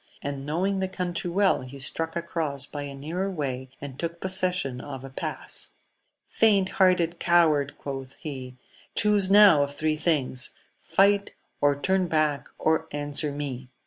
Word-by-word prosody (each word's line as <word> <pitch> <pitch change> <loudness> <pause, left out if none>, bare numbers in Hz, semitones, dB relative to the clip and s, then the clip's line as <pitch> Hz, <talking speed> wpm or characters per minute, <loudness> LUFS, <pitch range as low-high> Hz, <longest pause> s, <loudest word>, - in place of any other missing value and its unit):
and 140 0 -4
knowing 190 +6 0
the 190 - 0
country 180 -2 -3
well, 195 +2 +2
he 130 +2 -9
struck 165 +4 -2
across 160 -5 -1
by 145 - -6
a 140 -1 -6
nearer 165 +8 -3
way, 130 -7 -4
and 140 -2 -8
took 170 0 -4
pos 190 +1 +1
session 180 -9 0
of 135 -2 -7
a 135 - -9
pass. - - -4 0.6
Faint 200 -4 +3
hearted 175 -2 +3
coward! 155 -5 +3
quoth 135 -1 -6
he^ 130 -4 -6 0.4
chuse 205 -2 +3
now 200 -6 +7
of 140 0 -2
three 155 +1 0
things: 150 -5 0 0.3
fight, 200 +1 +2 0.3
or 145 -1 +3
turn 190 +3 +1
back', 155 -5 0
or 160 0 +1
answer 145 +1 -1
me 135 -3 -5
155 Hz, 155 wpm, -26 LUFS, 140-180 Hz, 0.6 s, now